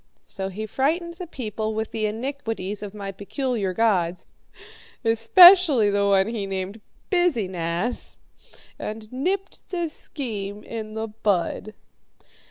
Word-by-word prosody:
So 190 0 -5
he 210 +3 -5
frightened 320 - 0
the 360 -1 -6
people 220 -6 -4
with 220 0 -3
the 215 -1 -1
iniquities 225 -4 -4
of 205 0 -7
my 200 -1 -5
peculiar 205 +1 -2
gods 180 -4 +1 0.8
especially 265 - +7
the 200 0 +2
one 195 -1 +4
he 220 -3 -3
named 195 +2 -4 0.3
'Biz 355 -6 +3
e 205 -4 -1
Nass' 175 +6 -3 0.6
and 215 +1 -6
nipped 380 +9 -3
the 345 -3 -2
scheme 210 -10 -5
in 220 -1 -6
the 220 0 -3
bud. 210 0 -1
220 Hz, 130 wpm, -24 LUFS, 200-265 Hz, 0.8 s, especially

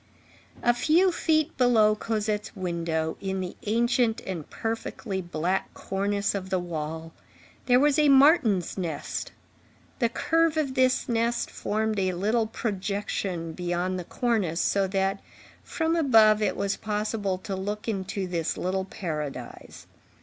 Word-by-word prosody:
A 240 - +4
few 330 +9 +3
feet 315 -2 +1
below 225 -4 +5
Cosette's 215 -1 -2
window, 170 -4 -2
in 190 -1 -2
the 180 -1 -4
ancient 235 +1 +2
and 175 -6 -5
perfectly 225 -3 -4
black 175 +2 -2
cornice 200 +1 -1
of 190 -2 -4
the 190 - +1
wall, 160 -2 -5 0.5
there 250 0 +6
was 290 +1 +3
a 300 -1 +5
martin's 265 - +4
nest; 165 -5 -4 0.7
the 235 -3 +2
curve 325 +5 +1
of 285 -4 0
this 255 -1 +2
nest 235 0 0
formed 215 0 -1
a 185 -1 +1
little 215 +5 +1
projection 200 -5 -3
beyond 180 +1 -2
the - - -4
cornice, 205 -6 -1
so 195 -1 +2
that 195 0 0 0.4
from 325 0 -1
above 225 -9 +5
it 200 -3 0
was 200 0 -1
possible 210 -2 -2
to 195 +1 -5
look 205 +3 -4
into 195 -2 -2
this 170 -3 -2
little 190 +1 -1
paradise. 150 -9 -6
205 Hz, 135 wpm, -26 LUFS, 185-235 Hz, 0.7 s, there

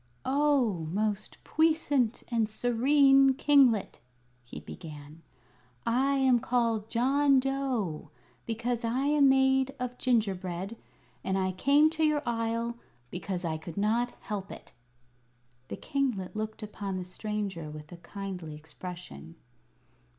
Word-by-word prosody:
"Oh, 260 - +1
most 205 +2 -2
puissant 300 -7 +1
and 230 -3 +1
serene 270 +4 +4
kinglet!" 265 -7 +3 0.4
he 120 - -9
began; 150 0 -10 0.6
"I 265 +4 +2
am 260 -3 +4
called 230 -3 0
John 275 +3 +3
Dough, 260 - -2 0.4
because 235 +1 -2
I 235 +3 0
am 290 -1 +5
made 265 0 +3
of 250 0 -4
gingerbread; 195 -4 -1 0.5
and 190 0 0
I 185 -1 0
came 285 +11 +4
to 320 0 -1
your 305 -1 +2
Isle 230 0 -2 0.3
because 180 0 -4
I 160 -1 -2
could 165 +2 -9
not 230 +4 +1
help 200 -2 -5
it." - - -11 1.0
The 100 - -6
kinglet 245 -10 -2
looked 215 +1 -4
upon 200 -2 -5
the 185 - -4
stranger 195 -3 -4
with 150 0 -10
a 175 - -9
kindly 180 -4 -7
expression. 165 +2 -10
230 Hz, 120 wpm, -29 LUFS, 185-265 Hz, 1.0 s, am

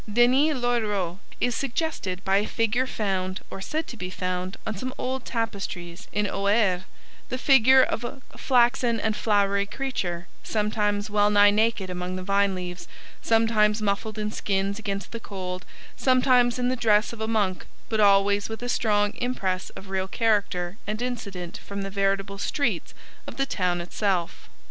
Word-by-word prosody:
Denys 255 +7 +4
l'Auxerrois 210 -7 0 0.2
is 245 - +1
suggested 235 - -3
by 195 0 +3
a 210 - +1
figure 230 +3 +1
found, 190 -5 -2
or 195 - -6
said 315 +10 -2
to 245 - -8
be 180 -5 -5
found, 185 0 -3
on 220 - -3
some 255 +6 -5
old 260 0 -3
tapestries 200 -5 -4
in 210 0 0
Auxerre, 200 -2 +1 0.4
the 255 - -2
figure 265 -1 +6
of 235 - -1
a 240 - -5 0.2
'flaxen 240 -2 +3
and 220 0 0
flowery 200 -2 +2
creature, 185 -10 -3 0.2
sometimes 210 -1 -1
wellnigh 205 0 +5
naked 215 -3 +1
among 180 0 -4
the 185 - -5
vine 200 0 +2
leaves, 180 -1 -6 0.3
sometimes 225 -2 +3
muffled 210 +1 -1
in 210 0 -2
skins 200 0 -1
against 200 -3 -4
the 230 - -5
cold, 185 -4 -6 0.3
sometimes 255 -2 +3
in 250 0 +1
the 255 - +1
dress 220 -2 +3
of 225 - -8
a 220 - -1
monk, 205 -5 0 0.2
but 220 - -1
always 200 0 +4
with 225 +2 -6
a 245 - -3
strong 205 -3 +2
impress 195 -7 -2
of 190 - -12
real 190 0 -1
character 200 -4 0
and 215 +3 -2
incident 200 -8 -5
from 200 0 -6
the 195 - -5
veritable 195 0 0
streets' 280 +7 -1 0.3
of - - -8
the 275 - +1
town 180 -8 0
itself. 180 0 -2
210 Hz, 165 wpm, -26 LUFS, 195-235 Hz, 0.4 s, figure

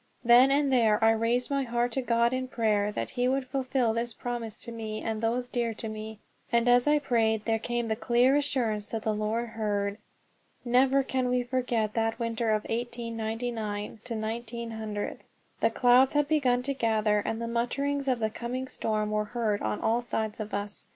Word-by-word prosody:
Then 240 +3 +7
and 280 -1 +2
there 225 -4 +4
I 225 - +6
raised 230 +4 0
my 275 0 +1
heart 240 -1 0
to 265 - -1
God 235 0 +2
in 255 0 -2
prayer 210 -4 +1
that - - -4
he 250 -1 0
would 265 +1 0
fulfil 255 -3 0
this 230 0 -2
promise 240 -3 -4
to 235 - -7
me 220 -2 -5
and 220 -1 -2
those 240 +2 0
dear 235 -2 -2
to 225 - -5
me; 215 0 -6 0.3
and 235 0 +2
as 245 +2 +5
I 300 0 +5
prayed 225 -6 +1
there 225 -1 +1
came 240 +1 -2
the 220 - 0
clear 245 +3 +3
assurance 230 -7 0
that 225 -1 -4
the 220 - +1
Lord 220 +3 -1
heard. 205 -2 -2 0.7
Never 265 +3 +4
can 260 -1 -1
we 250 0 +1
forget 245 -4 -1
that 225 0 0
winter 230 -1 -1
of 215 -1 +1
1899 225 -2 -4
1900. 220 -1 -4 0.4
The - - +3
clouds 255 +1 +4
had 295 -1 +2
begun 260 -5 +2
to 275 +2 -1
gather, 220 -4 +1
and 225 +2 -3
the 230 - -3
mutterings 275 +4 -1
of 255 -2 +2
the 220 -1 -1
coming 250 +3 -4
storm 215 -3 -1
were 210 0 0
heard 215 -2 -1
on 105 -1 -2
all 230 +2 +2
sides 220 -3 -3
of 215 -1 -5
us. 205 0 -4
235 Hz, 190 wpm, -28 LUFS, 220-250 Hz, 0.7 s, Then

